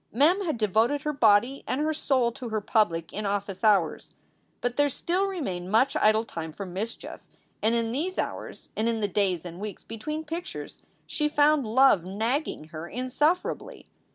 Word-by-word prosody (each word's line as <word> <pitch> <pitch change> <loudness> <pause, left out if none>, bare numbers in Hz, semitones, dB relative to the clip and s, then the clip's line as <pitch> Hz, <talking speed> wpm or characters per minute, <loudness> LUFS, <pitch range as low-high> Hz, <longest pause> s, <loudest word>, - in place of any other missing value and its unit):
Mem 315 - +4
had 315 -9 -1
devoted 225 +7 +2
her 300 -1 -1
body 240 +1 +3
and 255 - -1
her 310 +1 +1
soul 260 -5 +1
to 240 0 -7
her 220 -1 0
public 175 -6 +1
in 210 0 -3
office 200 0 -3
hours. 195 -7 +2 0.4
But 245 0 -2
there 290 0 +3
still 355 +8 0
remained 190 - -4
much 255 +6 +3
idle 215 +1 +4
time 165 -7 -6
for 200 - -6
mischief, 195 +6 -6 0.4
and 225 +2 +2
in 230 -1 0
these 335 +9 -2
hours, - - -4
and 225 +2 +1
in 225 -1 -1
the 205 - +1
days 190 -4 0
and 175 0 -8
weeks 210 0 -6
between 305 +8 -5
pictures, 330 +3 -6 0.2
she 300 -1 -1
found 295 -3 +3
love 235 -5 +5
nagging 220 - -2
her 155 +1 -7
insufferably. 295 - -1
230 Hz, 175 wpm, -27 LUFS, 205-290 Hz, 0.4 s, love